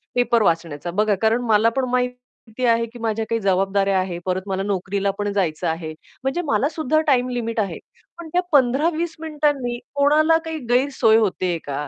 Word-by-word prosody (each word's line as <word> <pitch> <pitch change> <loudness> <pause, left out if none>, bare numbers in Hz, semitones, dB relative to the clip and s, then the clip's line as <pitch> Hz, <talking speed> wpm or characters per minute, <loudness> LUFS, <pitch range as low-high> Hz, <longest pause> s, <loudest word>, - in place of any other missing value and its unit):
Paper 245 -2 +2
वाचण्याचा. 165 -3 -1
बघा, 210 +3 +1
कारण 225 +2 +2
मला 220 0 +4
पण 265 - +1
माहिती 250 -1 -3
आहे, 230 -1 +3
की 235 +1 -13
माझ्या 225 -1 -1
काही 230 - 0
जबाबदाऱ्या 195 0 +1
आहेत. 180 -2 -3
परत 185 0 -1
मला 195 0 -2
नोकरीला 200 0 -1
पण 205 0 -2
जायचं 175 -6 -1
आहे 160 -1 -3 0.3
म्हणजे 270 +6 -1
मला 265 +1 +1
सुद्धा 310 -1 0
टाईम 255 -3 +3
लिमिट 230 -2 -3
आहे. 200 -2 -2 0.4
पण 345 -1 -9
त्या 360 - +3
15-20 310 +5 +2
मिनिटांनी 290 -6 -1 0.2
कोणाला 305 +3 +4
काही 320 0 -4
गैरसोय 245 -3 +3
होतेय 185 -5 0
का? 145 +1 -4
230 Hz, 170 wpm, -21 LUFS, 195-270 Hz, 0.4 s, मला